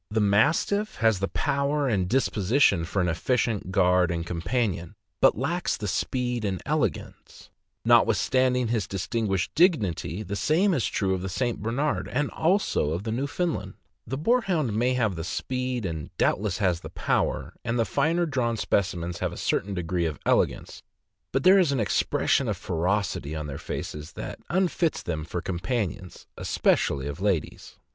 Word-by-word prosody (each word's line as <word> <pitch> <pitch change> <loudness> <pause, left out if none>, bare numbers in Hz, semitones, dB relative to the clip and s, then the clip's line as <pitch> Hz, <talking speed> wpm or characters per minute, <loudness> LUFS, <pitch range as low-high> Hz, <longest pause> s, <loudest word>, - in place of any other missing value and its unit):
The 110 +1 0
Mastiff 120 - +2
has 110 -4 +2
the 100 - 0
power 140 +4 0
and 95 -7 0
disposition 110 - +2
for 95 +2 -1
an - - 0
efficient 105 +2 0
guard 90 -2 +3
and 85 -1 -2
companion, 90 0 -2 0.3
but - - +5
lacks 170 +8 -1
the 105 - -4
speed 125 +5 -1
and 95 -3 -1
elegance; - - -3 0.3
notwithstanding 125 -2 +3
his 115 -3 0
distinguished 95 0 -2
dignity, 105 - +1
the 100 +1 -4
same 165 - +2
is 130 - +1
true 95 -2 0
of 95 - -2
the 95 - -4
St. 120 +4 -2
Bernard, 130 +8 -1
and 145 +3 -1
also 165 - +1
of 85 +4 -3
the 110 - -3
Newfound 145 +8 -1
land; 95 0 -6 0.3
the 135 +4 -3
Boarhound 175 - +1
may 125 +4 +1
have 110 -7 +1
the 80 - -4
speed, 125 +4 -3
and 80 -4 -4
doubtless 100 -3 +1
has 90 -5 +1
the - - -9
power, - - -1
and 115 +2 -1
the 115 - +2
finer 165 - +1
drawn 125 -7 -1
specimens 90 -5 -1
have - - -1
a - - -8
certain 100 0 -1
degree 90 0 -1
of 75 -3 -4
elegance, - - 0 0.5
but 135 +1 0
there 190 +2 +7
is 170 -6 +3
an 135 - 0
expression 105 - +1
of - - -1
ferocity 85 -3 -1
on 75 -1 -4
their 70 -2 -6
faces 75 0 -6
that - - -7
unfits 175 -1 +1
them 80 -3 -3
for 85 +2 -5
companions, 90 0 -3
especially 70 -1 +1
of 75 +4 -5
ladies. 95 -7 -2
105 Hz, 165 wpm, -26 LUFS, 90-130 Hz, 0.5 s, there